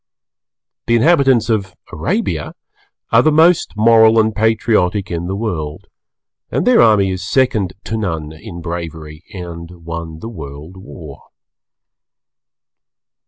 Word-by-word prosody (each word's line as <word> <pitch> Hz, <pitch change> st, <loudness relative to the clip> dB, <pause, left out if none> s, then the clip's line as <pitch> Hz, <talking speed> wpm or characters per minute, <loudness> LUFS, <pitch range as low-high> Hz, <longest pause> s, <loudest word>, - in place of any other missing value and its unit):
The 115 Hz, -, +3 dB
inhabitants 135 Hz, -4 st, +3 dB
of 100 Hz, -5 st, -1 dB, 0.2 s
Arabia -, -, -2 dB, 0.6 s
are 115 Hz, -, +6 dB
the 155 Hz, -, +3 dB
most 160 Hz, -5 st, +3 dB
Moral 110 Hz, 0 st, +5 dB
and 110 Hz, 0 st, +2 dB
Patriotic 105 Hz, -3 st, +1 dB
in 85 Hz, 0 st, -3 dB
the 95 Hz, -, -3 dB
World, 85 Hz, -9 st, -5 dB, 0.6 s
and -, -, -1 dB
their 250 Hz, -1 st, +5 dB
army 105 Hz, -4 st, +4 dB
is 95 Hz, 0 st, -4 dB
second 125 Hz, -8 st, +1 dB
to 110 Hz, -, -3 dB
none 80 Hz, -7 st, -3 dB
in 85 Hz, +2 st, -10 dB
bravery 80 Hz, -2 st, -7 dB
and 85 Hz, -2 st, -9 dB
won 85 Hz, -1 st, -6 dB
the 95 Hz, -, -8 dB
World 75 Hz, -3 st, -10 dB
War. 80 Hz, -6 st, -12 dB
95 Hz, 120 wpm, -17 LUFS, 85-115 Hz, 0.6 s, are